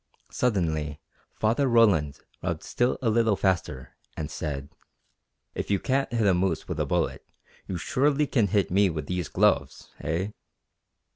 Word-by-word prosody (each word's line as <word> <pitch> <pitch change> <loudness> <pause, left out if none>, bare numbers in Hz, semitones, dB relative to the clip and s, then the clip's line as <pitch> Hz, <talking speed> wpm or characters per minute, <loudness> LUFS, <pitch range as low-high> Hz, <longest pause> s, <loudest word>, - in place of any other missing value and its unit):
Suddenly 80 - 0 0.4
Father 115 +6 +1
Roland 100 - +3 0.2
rubbed - - -3
still 120 +1 0
a 115 - +3
little 115 -2 +3
faster, 85 -10 -1 0.2
and 75 -1 -4
said: 70 -3 -4 0.8
"If - - -4
you 100 -1 +2
can't 135 +4 0
hit 115 -2 +1
a 95 - +5
moose 90 -2 0
with 85 -3 -4
a 75 - 0
bullet 85 +1 -1 0.4
you 95 - -3
surely 145 - +1
can 115 -7 +2
hit 100 -1 +1
me 100 +1 +4
with 80 -3 -4
these 90 0 -3
gloves - - +1
eh?" 85 +6 -2
95 Hz, 150 wpm, -26 LUFS, 80-115 Hz, 0.8 s, a